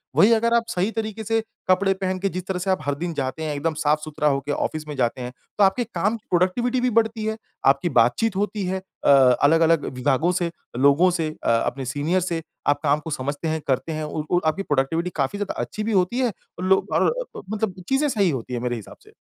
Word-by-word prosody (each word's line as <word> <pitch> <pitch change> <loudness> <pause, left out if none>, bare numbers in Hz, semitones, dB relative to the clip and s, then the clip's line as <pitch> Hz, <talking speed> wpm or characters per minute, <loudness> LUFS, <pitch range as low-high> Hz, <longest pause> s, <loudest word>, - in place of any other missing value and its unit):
वही 210 - +6
अगर 230 +1 +2
आप 235 0 +4
सही 190 -2 0
तरीके 220 -1 -4
से 225 +1 +1 0.3
कपड़े 195 +1 +4
पहन 185 0 -1
के 195 +1 0
जिस 185 -1 -5
तरह 190 -2 -2
से 190 +2 -3
आप 185 - +1
हर 145 0 0
दिन 170 +3 -4
जाते 140 +2 -3
हैं, 155 -1 -2
एकदम 160 +3 -1
साफ-सुथरा 150 0 0
होके 140 0 0
ऑफ़िस 155 +1 -2
में 150 - -5
जाते 125 -1 0
हैं, 125 0 -5 0.3
तो 210 - +5
आपके 195 +6 +3
काम 210 +2 -1
की 215 - -28
प्रोडक्टिविटी 235 +8 +1
भी 250 - +2
बढ़ती 225 -1 -2
है। 220 0 -2 0.3
आपकी 140 +6 +3
बातचीत 125 - +2
होती 205 0 -1
है 190 +1 -2 0.2
अ, - - +5
अलग-अलग 145 +4 +5
विभागों 135 +6 +2
से, 175 -1 -1 0.3
लोगों 140 +7 +5
से 165 -3 -1
अ - - +1 0.2
अपने 135 -1 -3
सीनियर 145 +8 0
से, 170 -2 -2 0.3
आप 145 0 +3
काम 145 0 +3
को 150 - -8
समझते 145 +3 -3
हैं, 160 0 -1
करते 135 +4 0
हैं 155 0 -3
और 150 0 -4
और 175 - +3
आपकी 160 +5 +1
प्रोडक्टिविटी 155 +3 0
काफ़ी 140 +6 -1
ज़्यादा 205 -1 -2
अच्छी 215 - -4
भी 225 - -1
होती 195 +4 +1
है। 250 -3 +2 0.3
लो 190 +1 +3
और - - +3
अ, - - -3 0.2
ब - - -11
मतलब 210 -4 -2
चीज़ें 270 +3 +2
सही 200 -7 +2
होती 130 -4 -4
हैं 120 - -2
मेरे 120 0 -1
हिसाब 110 -4 -10
से। - - -20
170 Hz, 235 wpm, -23 LUFS, 145-200 Hz, 0.3 s, वही